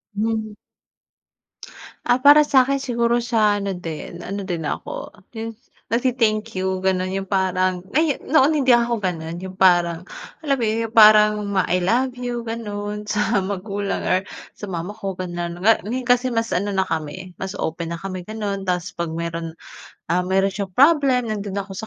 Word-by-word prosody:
Hmm. 220 0 -2 1.5
Ah, 245 +1 +4
para 290 +2 +8
sakin 275 0 +3
siguro 235 -2 +1
sa 215 -3 +2
ano 200 -1 -2
din, 170 0 -7
ano 200 +2 -4
din 170 -3 -3
ako - - -5 0.2
yun 225 0 -6 0.3
nag-te-thank 230 -3 +1
you, 190 0 -2
ganon 185 -1 +1
yung 195 -1 -4
parang, 185 -1 +1 0.2
ay, 310 -3 +2
noon 290 0 +3
hindi 255 -3 +5
ako 235 -1 +1
ganon, 170 -3 -3
yung 190 0 -8
parang 175 -2 +3 0.4
alam 280 -3 +1
yung 225 0 0
parang 210 -1 +6
ma 195 -2 +1
I 180 - +3
love 240 +8 +1
you 245 -1 -3
ganon 210 -2 -5
sa 210 -1 +1
magulang 200 +1 -3
or 185 - +2 0.3
sa 205 - -9
mama 175 +1 -4
ko 195 -3 -5
ganon. 175 -1 -4
Ngayon 225 +3 +2
kasi 245 +1 +3
mas 230 -1 -1
ano 200 +3 -1
na 190 - +3
kami, 165 +1 -5
mas 190 0 -5
open 170 +1 -3
na - - -7
kami 185 -1 -6
ganon, 205 -3 -4
tapos 180 -1 -1
'pag 170 -1 -2
meron, 165 -1 -4 0.6
ah, 180 +1 +1
meron 195 +1 +2
siyang 190 -1 -5
problem 270 - +4
nandoon 200 -2 -3
ako 195 - -16
sa 220 - -5
205 Hz, 165 wpm, -22 LUFS, 185-230 Hz, 1.5 s, para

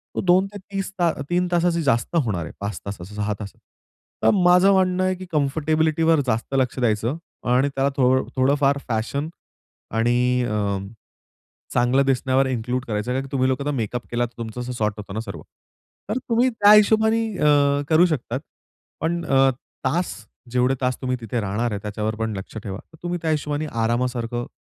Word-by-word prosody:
तो - - 0
2 185 +1 +4
ते 205 - -6
30 195 0 -3
ता 170 -2 +3 0.2
3 180 +1 +1
तासाची 170 -1 +2
जास्त 120 +4 +1
होणार 110 - +1
आहे. - - -7
5 100 +1 -4
तासाचं, 100 -1 -7
6 105 0 -1
तासात. 100 -2 -9 0.6
तर - - +6
माझं 180 +1 +5
म्हणणं 185 -1 +2
आहे 185 0 +1
की 185 +1 -9
कम्फर्टेबिलिटीवर 155 +2 +2
जास्त 115 +3 -1
लक्ष 130 0 0
द्यायचं 115 +4 0 0.3
आणि 130 +3 +3
त्याला 135 +1 +2
थो 125 -1 +4 0.3
थोडंफार 140 +1 +3
फॅशन 125 +7 -1 0.7
आणि 125 +1 +2
अ, 105 -3 -1 1.0
चांगलं 125 +3 +3
दिसण्यावर 130 0 +2
इन्क्लूड 125 0 -2
करायचं, 105 +2 -2
कारण 135 +1 -2
तुम्ही 130 -1 +2
लोकं 130 +1 -1
आता 145 - 0
मेकअप 120 +1 -3
केला 120 0 0
तर 120 - -18
तुमचं 115 +1 -5
असं 125 +1 -4
सॉर्ट 110 -3 -1
होतो 100 -2 -8
ना 110 - -3
सर्व. 100 -4 -7 0.7
तर 225 +5 0
तुम्ही 240 +3 +4
त्या 210 -3 +5
हिशोबाने 220 +2 +5 0.2
अ, 145 -1 +3
करू 165 +3 +5
शकतात, 130 -5 -2 0.6
पण 170 +2 -1
अ, 135 -2 +4 0.3
तास, 170 +7 0 0.4
जेवढे 125 +1 +2
तास 125 0 +1
तुम्ही 130 0 0
तिथे 115 +1 -2
राहणार 110 +3 -1
आहे 100 - -3
त्याच्यावर 105 +1 -3
पण 110 -2 -2
लक्ष 95 +3 -8
ठेवा. 95 -2 -5
तर 160 - -17
तुम्ही 175 0 -2
त्या 160 - 0
हिशोबाने 150 0 -1 0.2
आरामासारखं 120 0 -1
130 Hz, 175 wpm, -23 LUFS, 115-160 Hz, 1.0 s, तर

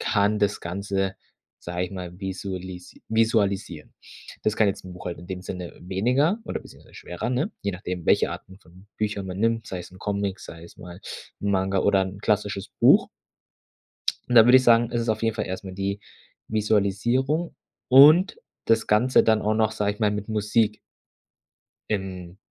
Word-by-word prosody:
kann 105 -1 +1
das 100 0 0
Ganze, 95 +2 -2 0.4
sage 90 +1 -3
ich 90 - -7
mal, 90 -2 -7
visualis 95 -2 -6
visualisieren. 100 -7 0 0.5
Das 110 0 0
kann 110 - +4
jetzt 100 - -2
'n 90 - -9
Buch 90 - -10
halt 85 - -4
in 85 - -11
dem 90 -1 -5
Sinne 90 -2 -7
weniger 125 - +1
oder - - -4
beziehungsweise - - -17
schwerer, 85 +7 -5
ne? 135 - -1
Je 100 - -1
nachdem 90 -1 -5
welche - - +3
Arten 95 +1 -9
von 90 +1 -19
Büchern 105 -2 -2
man 95 0 -6
nimmt, 115 +1 0
sei 95 - -4
es 90 - -10
'n 95 - -14
Comic, 100 -1 -2
sei 80 0 -10
es 85 - -15
mal 90 +1 -11 0.4
'n 100 - -1
Manga 95 0 +1
oder 100 0 +3
'n 95 +1 -7
klassisches 105 -2 -1
Buch. - - +6 1.2
Und 125 - 0
dann 115 - +9
würde 125 +2 +8
ich 130 - +1
sagen, 115 -1 +5
es 120 -1 0
ist 115 - -3
auf 110 0 0
jeden 115 0 +1
Fall 105 - -2
erst 95 +1 -5
mal 95 -1 -8
die 100 +1 -3 0.5
Visualisierung 110 - 0 0.3
und 155 - +7 0.3
das 115 0 +2
Ganze 120 +5 +4
dann 110 -1 +3
auch 110 - +1
noch, 110 0 +2
sage 105 -2 -1
ich 105 - -18
mal, 105 -2 +2
mit 105 0 -4
Musik 105 0 +1 1.1
im 95 -3 -4
100 Hz, 185 wpm, -24 LUFS, 95-110 Hz, 1.2 s, dann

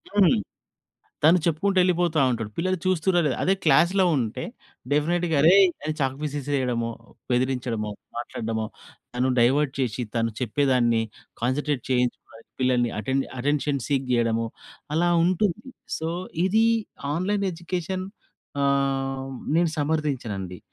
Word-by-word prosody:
హ్మ్. 190 -7 +5 0.9
తను 165 +4 +7
చెప్పుకుంటూ 185 +4 +1
వెళ్ళిపోతా 175 -3 +2
ఉంటడు, 110 -3 -3
పిల్లలు 185 +2 0
చూస్తుర్రా 185 -1 +2
లేదా. 135 -4 0
అదే 190 - +3
క్లాస్‌లో 170 +6 +4
ఉంటే 120 0 -2 0.5
డెఫినిట్‌గా 165 +3 +1
అరేయ్! 190 +5 +7 0.2
అని 155 - -1
చాక్ 135 -1 0
పీస్ 150 -1 -3
ఇసిరేయడమో, 125 -4 -1 0.4
బెదిరించడమో, 125 -4 0 0.3
మాట్లాడడమో, 115 -2 -3 0.5
తను 125 +2 +1
డైవర్ట్ 135 +4 +3
చేసి, 125 -2 -1
తను 115 0 +1
చెప్పేదాన్ని 125 -2 +2 0.4
కాన్సంట్రేట్ 130 +2 0
చేయించుకోవడానికి 125 -2 -2
పిల్లల్ని 125 -2 +2
అటెన్ 135 +3 0 0.2
అటెన్షన్ 145 +1 0
సీక్ 135 -2 0
చేయడము 115 -1 +1 0.5
అలా 175 +1 +3 0.2
ఉంటుంది. 190 +5 0 0.3
సో, 160 +1 -3 0.4
ఇది 220 +4 +3 0.5
ఆన్‍లైన్ 195 +5 0
ఎడ్యుకేషన్ 180 +2 -4 0.6
ఆహ్, 135 -1 0 0.3
నేను 170 -1 +3
సమర్థించనండి. 130 - -2
140 Hz, 115 wpm, -25 LUFS, 125-170 Hz, 0.9 s, తను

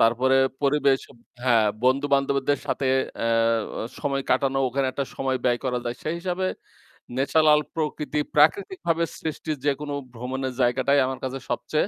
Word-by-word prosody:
তারপরে 125 +4 +4 0.3
পরিবেশ 140 -1 +3 0.4
হ্যাঁ, 115 -4 +4 0.2
বন্ধু-বান্ধবদের 140 +1 +2
সাথে 135 - -1 0.4
এহ 115 0 +3 0.2
অ - - -2 0.2
সময় 140 -2 -1
কাটানো। 135 0 +2
ওখানে 135 +2 0
একটা 140 - -2
সময় 130 -1 -1
ব্যয় 120 -1 +2
করা 125 -1 0
যায়। 120 0 -3
সেই 155 - -2
হিসাবে 185 +1 -1 0.7
natural 150 +2 +4 0.2
প্রকৃতি, 150 -1 -2 0.2
প্রাকৃতিকভাবে 170 +2 +2 0.2
সৃষ্টির 155 -1 -4
যেকোনো 145 0 -1 0.2
ভ্রমণের 130 +2 -4
জায়গাটাই 130 +3 +3
আমার 130 0 -4
কাছে 130 +1 -3
সবচেয়ে 150 +8 0
135 Hz, 135 wpm, -25 LUFS, 130-150 Hz, 0.7 s, তারপরে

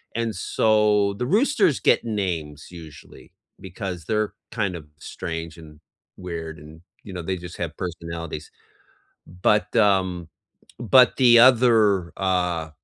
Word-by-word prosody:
and 115 -1 -2
so, 105 +1 +2
the 125 - -1
roosters 215 - +2
get - - +2
names 85 -9 -4
usually, 80 -4 -14 0.3
because 90 -2 -7
they're 110 +1 -1 0.2
kind 100 -5 -2
of 75 -3 -13
strange 80 -1 -7
and 75 -2 -14 0.4
weird, 85 -3 -7
and, 80 +2 -14 0.2
you 100 - -10
know, 90 - -5
they 95 +2 -3
just 90 0 -10
have 85 -2 -5
personalities. 85 -3 -6 0.9
But, 105 -2 +2
um, 95 -6 +1 0.5
but 125 +2 +4
the 120 -3 +6
other, 115 -7 +4
uh 90 -4 -1
90 Hz, 125 wpm, -23 LUFS, 85-110 Hz, 0.9 s, the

